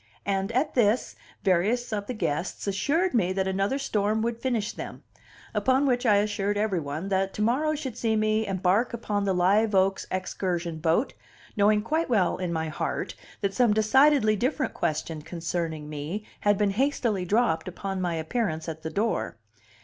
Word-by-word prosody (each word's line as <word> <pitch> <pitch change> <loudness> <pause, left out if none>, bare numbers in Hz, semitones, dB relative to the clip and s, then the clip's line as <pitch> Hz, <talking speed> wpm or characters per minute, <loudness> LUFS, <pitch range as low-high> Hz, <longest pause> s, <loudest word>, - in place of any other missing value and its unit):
And, 195 +1 0
at 275 +5 +1
this, 230 -1 +2 0.3
various 210 +6 +1
of 205 -1 -3
the 250 - -4
guests 170 -4 -2
assured 285 - +1
me 190 -7 +2
that 190 0 0
another 195 +7 0
storm 220 -5 0
would 235 0 -2
finish 235 -5 -1
them; - - -8 0.5
upon 265 +1 +2
which 250 -2 +1
I 210 - +6
assured 205 0 0
every 205 -4 +1
one 155 +5 -4
that 195 0 0
to 210 - 0
morrow 295 +7 +1
should 270 -6 -5
see 225 -2 0
me 215 0 +1
embark 195 +5 +1
upon 205 -3 -2
the 195 - +1
Live 200 +4 +3
Oaks 190 0 +2
excursion 175 -3 -2
boat, 165 - +1 0.4
knowing 210 0 +3
quite 315 +7 0
well 195 -8 +2
in 180 -2 -3
my 160 -1 -1
heart 155 - -3 0.3
that 200 -1 0
some 235 -3 +3
decidedly 220 +1 +4
different 260 +6 -1
question 155 0 -2
concerning 165 -2 -4
me 155 +8 -5
had 205 -1 +2
been 205 -1 +2
hastily 235 -4 0
dropped 205 -2 +1
upon 190 +1 -4
my 175 -2 -1
appearance 160 -1 -2
at 160 -1 -5
the 160 - -4
door. 205 - -1
205 Hz, 170 wpm, -27 LUFS, 180-235 Hz, 0.5 s, I